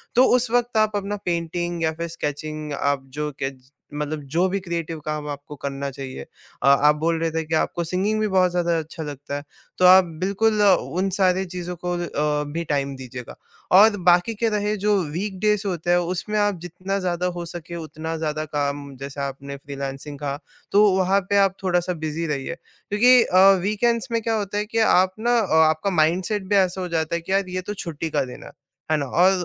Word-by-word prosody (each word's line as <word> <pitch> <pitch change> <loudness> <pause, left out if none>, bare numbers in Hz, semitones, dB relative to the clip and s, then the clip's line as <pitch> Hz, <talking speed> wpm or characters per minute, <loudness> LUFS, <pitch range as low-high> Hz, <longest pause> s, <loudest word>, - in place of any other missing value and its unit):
तो 255 +2 +7
उस 250 -2 +1
वक़्त 240 -1 +1
आप 215 -1 +2
अपना 205 0 -2
पेंटिंग 175 0 -2
या 160 - +2
फिर 170 +1 -4
स्केचिंग 155 -1 -5
आप 140 -1 0 0.2
जो 150 0 -1
केज 135 -1 -6 0.2
मतलब 150 +1 -3
जो 175 +3 +3
भी 200 - -1
क्रिएटिव 170 -3 -4
काम 150 -1 -3
आपको 145 +1 -7
करना 140 0 -4
चाहिए। 130 - -7
अ, - - -7
आप 145 +2 +5
बोल 165 +1 +1
रहे 165 0 0
थे 160 0 -1
कि 160 +1 -1
आपको 170 +2 0
सिंगिंग 190 +6 0
भी 215 - +1
बहुत 185 -2 +3
ज़्यादा 175 -1 +1
अच्छा 160 +1 -7
लगता 145 -1 -6
है, 145 - -5 0.3
तो 185 - +4
आप 185 +1 +8 0.2
बिल्कुल 210 +2 +2
उन 190 -1 +2
सारे 190 -1 +3
चीज़ों 180 -1 -6
को 180 - 0
अ, 150 -3 -1
भी 170 +1 -2
टाइम 140 -2 -1
दीजिएगा। 130 -2 -9 0.4
और 205 +3 +7
बाकी 175 +6 +5
के 225 +2 +1
रहे 210 0 0
जो 205 +1 +2 0.2
वीकडेज़ 205 +3 0
होते 175 -2 -3
हैं, 175 - +5
उसमें 185 +4 -1
आप 205 -1 +2
जितना 185 +3 -4
ज़्यादा 180 -1 -1
हो 175 - -4
सके 170 0 -8
उतना 160 +1 -5
ज़्यादा 155 -1 -2
काम, 140 -2 -3
जैसे 140 +1 -6
आपने 140 0 -5
फ्रीलांसिंग 140 +1 -7
कहा, 145 -1 -3 0.3
तो 205 +1 +6
वहाँ 190 +1 +3
पे 200 - +3
आप 190 -1 -2
थोड़ा-सा 180 -1 +1
बिजी 155 +2 -2
रहिए। 150 +2 -3
क्योंकि 245 +8 +3
अ, 185 - +1 0.2
वीकेंड्स 230 +5 0
में 230 - +1
क्या 225 0 0
होता 205 0 -3
है 210 - 0
कि 225 +1 -5 0.2
आप 185 +1 +3
ना 240 +2 +2
अ, 205 -7 -1 0.2
आपका 160 +5 0
माइंडसेट 185 +6 +1
भी 205 - +3
ऐसा 185 -1 +2
हो 180 - -3
जाता 165 -1 -1
है 170 - -2
कि 170 - -7
यार 195 -1 +1
ये 185 0 -3
तो - - -2
छुट्टी 165 -1 -4
का 140 - 0
दिन 125 - -10
है, - - -11 0.4
है - - +4
ना? 145 - -2
और 175 +8 +4
175 Hz, 210 wpm, -23 LUFS, 150-195 Hz, 0.4 s, आप